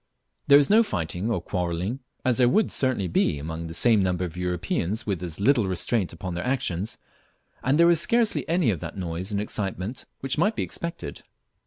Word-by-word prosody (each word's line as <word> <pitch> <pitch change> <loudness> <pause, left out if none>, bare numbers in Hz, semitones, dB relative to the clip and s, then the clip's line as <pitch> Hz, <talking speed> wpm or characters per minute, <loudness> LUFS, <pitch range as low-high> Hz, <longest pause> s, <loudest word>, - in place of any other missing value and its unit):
There 140 - +9
is 145 - +4
no 215 +3 +6
fighting 90 - -2
or 115 - 0
quarrelling, 90 +6 -2 0.3
as 125 -2 +2
there 125 -1 +5
would 215 - +2
certainly 130 -8 +1
be 80 - +1
among 80 +3 -5
the 80 - -7
same 110 +3 +4
number 90 -1 0
of 85 -2 -7
Europeans 90 +3 -2
with 95 -5 -2
as 85 -2 -6
little 115 -1 +3
restraint 95 +2 0
upon 90 +2 -6
their 85 - -3
actions, 115 -4 -1 0.7
and 135 +3 +2
there 170 +1 +6
is 170 -2 +3
scarcely 230 -1 +1
any 170 -8 +3
of 90 - -3
that - - -7
noise 90 +2 -4
and 100 - 0
excitement 100 +2 -4 0.2
which 135 +2 -1
might 210 +6 +2
be - - -1
expected. 125 - -6
100 Hz, 195 wpm, -25 LUFS, 90-130 Hz, 0.7 s, There